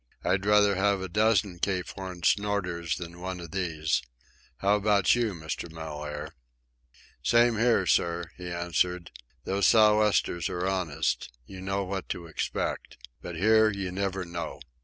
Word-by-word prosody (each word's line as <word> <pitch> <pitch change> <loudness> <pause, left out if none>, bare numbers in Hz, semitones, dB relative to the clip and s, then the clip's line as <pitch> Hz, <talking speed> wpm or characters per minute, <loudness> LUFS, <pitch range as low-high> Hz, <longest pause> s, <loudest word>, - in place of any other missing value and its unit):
I'd 95 0 +1
sooner 105 0 +4
have 100 +1 +2
a 95 - -4
dozen 105 -2 +2
Cape 90 -1 -1
Horn 95 -2 -7
snorters 90 -6 0
than 85 0 -8
one 95 0 -4
of 85 -2 -9
these. 80 -5 -1 0.6
How 100 +1 +3
about 100 -2 +3
you, 115 -5 0
Mr. 80 +1 -5
Mellaire?" 75 -1 -6 0.9
"Same 120 0 +4
here, 115 -5 +3
sir," 85 -1 +1
he 90 -1 -7
answered. 85 0 -1 0.3
"Those 100 +1 +2
sou' 105 -1 +6
westers 100 -6 +1
are 90 +1 -2
honest. 85 -9 -1
You 95 +5 -10
know 100 +1 -1
what 95 0 -5
to 85 - -4
expect. 80 - -3 0.2
But 90 -1 -6
here 110 +5 +5
you 100 -3 -3
never 95 0 -2
know. 85 -1 -5
95 Hz, 150 wpm, -28 LUFS, 85-100 Hz, 0.9 s, sou